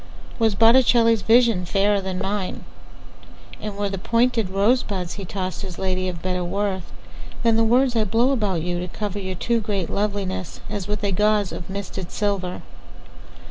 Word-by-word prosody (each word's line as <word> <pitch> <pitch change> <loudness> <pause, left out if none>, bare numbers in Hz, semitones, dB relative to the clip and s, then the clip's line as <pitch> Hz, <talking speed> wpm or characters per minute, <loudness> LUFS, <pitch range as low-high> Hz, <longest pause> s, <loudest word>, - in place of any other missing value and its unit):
Was 220 -3 +2
Botticelli's 230 0 +5
visionFairer 205 -3 +3
than 190 -1 -4
mine; 195 0 -3 1.0
And 210 -1 -5
were 205 0 0
the 195 -1 -4
pointed 230 0 +1
rosebudsHe 195 -2 0
tossed 185 -1 -4
his 185 -4 -6
ladyOf 185 -2 -2
better 180 0 -1
worthThan 200 +4 -3
the 225 - +4
words 245 +2 +3
I 225 - +3
blow 230 +5 +2
about 205 -10 0
youTo 175 0 -3
cover 205 -1 -4
your 190 -1 -4
too 235 +6 0
great 200 -4 -2
lovelinessAs 200 -1 -3
with 210 0 -3
a 200 - +1
gauzeOf 210 -2 0
misted 190 -2 -5
silver? 200 -3 -2
200 Hz, 140 wpm, -23 LUFS, 185-225 Hz, 1.0 s, Botticelli's